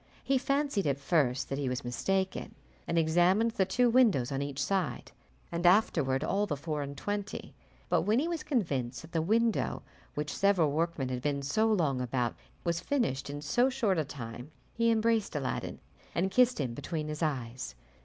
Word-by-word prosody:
He 270 -1 +2
fancied 275 - 0
at 140 -1 +1
first 140 -4 +1
that 135 - -2
he 135 -3 -1
was 125 -1 -3
mistaken, 190 +10 -1 0.3
and 170 - 0
examined 175 +7 +3
the 195 -5 +1
two 245 +6 +3
windows 225 - +4
on 135 0 -1
each 140 -1 -4
side, 185 +3 -1 0.4
and 170 0 -2
afterward 160 -8 +3
all 200 +5 +1
the 145 - -2
four 150 0 -3
and 140 0 -6
twenty; 205 +4 -4 0.3
but - - +2
when 215 +2 +2
he 295 +6 +1
was 340 -2 -2
convinced 140 - -1
that 160 - -13
the 165 - +1
window 225 +5 +1 0.3
which 150 0 -3
several 190 -7 +3
workmen 160 -3 -1
had 125 -1 -3
been 140 0 -1
so 215 +11 +2
long 150 -11 +1
about 125 -1 -1 0.3
was 170 -1 0
finished 170 - -1
in 145 +1 -5
so 245 - +3
short 225 -9 +1
a - - +2
time, 125 -2 -8 0.2
he 230 0 +2
embraced 225 -4 +2
Aladdin 135 -3 -3 0.4
and 190 +3 +1
kissed 250 -1 +4
him 130 -5 -1
between 155 +4 -4
his 150 +1 -5
eyes. 125 - -3
165 Hz, 185 wpm, -30 LUFS, 140-215 Hz, 0.4 s, windows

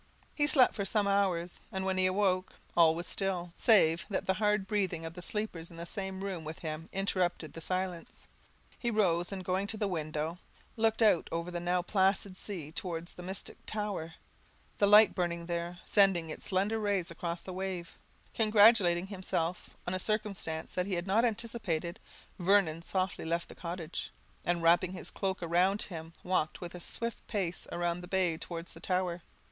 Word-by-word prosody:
He 290 -1 +2
slept 265 -4 +6
for 200 - -2
some 205 +1 +1
hours; 185 -3 +1
and 190 -2 -2
when 190 0 0
he 185 - +4
awoke, 185 -1 +1 0.2
all 165 -2 +6
was 170 +1 -4
still, 180 -3 -2
save 175 -7 +5
that 195 - -1
the 190 - +2
hard 210 0 +1
breathing 190 -6 -1
of 165 - -6
the 180 - -8
sleepers 180 -4 -3
in 170 - -12
the 170 - -5
same 190 0 -5
room 190 -5 -3
with 155 +1 -6
him 160 0 -5
interrupted 185 -5 -1
the 165 - -8
silence. 185 -1 -3 0.5
He 235 - 0
rose, 175 -6 +2
and 190 -2 -5
going 190 +2 0
to 220 - -3
the 210 -1 0
window, 155 -1 -2 0.4
looked 225 0 +2
out 210 -6 +4
over 170 +1 -2
the 175 - -2
now 175 +1 +1
placid 190 0 +2
sea 180 -6 -6
towards 170 0 -4
the - - -10
mystic 190 +2 -6
tower; 205 -7 -3 0.6
the 200 - +5
light 210 +1 +8
burning 170 -2 -1
there, 170 0 -3
sending 190 -6 +3
its - - -7
slender 200 +3 +1
rays 200 -5 0
across 170 0 -4
the 185 - -7
waves. 185 -2 -4 0.4
Congratulating 210 -5 +5
himself 185 -3 -3
on 175 - -2
a 185 - 0
circumstance 200 -6 -2
he 185 +1 -1
had 175 0 -2
not 205 +4 +3
anticipated, 215 -6 -2 0.4
Vernon 175 -3 +3
softly 185 +1 -1
left 170 +1 -1
the - - -9
cottage, 170 -1 -5 0.4
and, 175 -1 +1
wrapping 175 +2 +4
his 180 - -6
cloak 190 -2 -2
round 180 +4 +3
him, 165 -3 -7
walked 180 -4 0
with 175 -1 -6
a 180 - -7
swift 235 +6 -3
pace 185 -4 -2
round 175 0 -1
the 180 - -9
bay 180 -3 +1
towards 165 +1 -7
the 165 - -12
tower. 180 -1 -1
185 Hz, 180 wpm, -32 LUFS, 170-200 Hz, 0.6 s, light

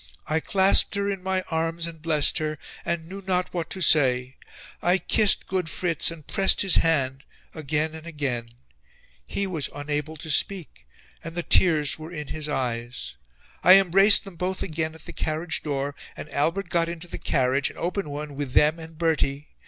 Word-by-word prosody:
"I 155 +1 0
clasped 190 +4 +3
her 200 0 0
in 195 -2 -5
my 190 0 -1
arms 165 +1 -1
and 165 -2 -9
blessed 155 -2 +2
her, 155 -1 -3 0.3
and 170 -1 -3
knew 195 +3 -8
not 180 -1 0
what 170 -2 -3
to 190 - -5
say. 130 -5 +3 0.5
I 180 +2 +4
kissed 210 +1 +3
good 185 -4 -2
Fritz 165 +2 +1
and 165 -3 -8
pressed 195 0 +3
his 195 - +4
hand 135 -4 +1 0.3
again 155 +1 -2
and 160 +1 -10
again. 135 -7 -3 0.8
He 200 - -1
was 165 -7 -2
unable 150 +2 -3
to 160 0 -6
speak 150 - -1 0.4
and 165 +1 -8
the 175 - -1
tears 155 -5 +3
were 160 +2 -9
in 150 -4 -7
his 155 -1 -4
eyes. 120 - -3 0.5
I 185 - +9
embraced 195 +2 +6
them 195 -4 -12
both 185 +2 -2
again 160 -2 -3
at 160 - -15
the - - -9
carriage 160 +2 -3
door, 140 -1 -3 0.2
and - - -7
Albert 165 +8 -1
got 170 -1 +1
into 170 +1 -7
the - - -7
carriage, 130 +2 +1
an - - -14
open 180 -1 -3
one, 145 0 -6
with 140 -3 -4
them 155 +2 +4
and 160 -1 -11
Bertie... 150 -3 -1
160 Hz, 185 wpm, -25 LUFS, 145-180 Hz, 0.8 s, I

